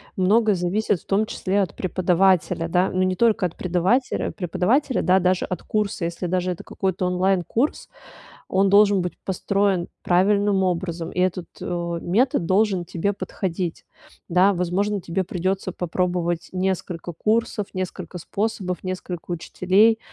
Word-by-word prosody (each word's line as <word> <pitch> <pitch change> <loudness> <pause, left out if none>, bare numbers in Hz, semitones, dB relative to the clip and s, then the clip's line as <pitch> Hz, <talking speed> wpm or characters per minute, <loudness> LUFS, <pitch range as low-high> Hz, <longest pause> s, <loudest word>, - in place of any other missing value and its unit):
Много 210 +2 +3
зависит 185 +2 0
в - - -27
том 200 +2 +1
числе 200 0 0
от 180 -6 -3
преподавателя, 180 -2 +2
да, 180 +2 +2
но 185 0 +1
не 185 0 +1
только 225 -1 +3
от 170 - -3
предавателя 185 +8 0
преподавателя, 225 - 0
да, 185 +1 +4
даже 180 0 +1
от 180 -3 -4
курса, 210 -4 -1
если 170 +2 -4
даже 180 +1 0
это 175 - -6
какой-то 190 -1 -2
онлайн-курс, 185 - 0 0.6
он 195 +1 +3
должен 200 0 +5
быть 180 -2 -2
построен 195 -1 0 0.2
правильным 200 +2 +3
образом. 170 -2 -2
И 180 - -1
этот, 180 -1 0
э, 170 -1 -3
метод 225 +2 +1
должен 190 -1 +2
тебе 175 +4 -1
подходить. 180 -3 -4 0.4
Да, 180 +3 +4
возможно, 195 +3 0
тебе 175 +2 -2
придётся 185 +1 -2
попробовать 175 -1 -1
несколько 185 -2 -2
курсов, 215 +3 0
несколько 185 -1 -5
способов, 195 -1 -3
несколько 180 -2 -5
учителей. 190 +6 +3
185 Hz, 140 wpm, -23 LUFS, 175-200 Hz, 0.6 s, должен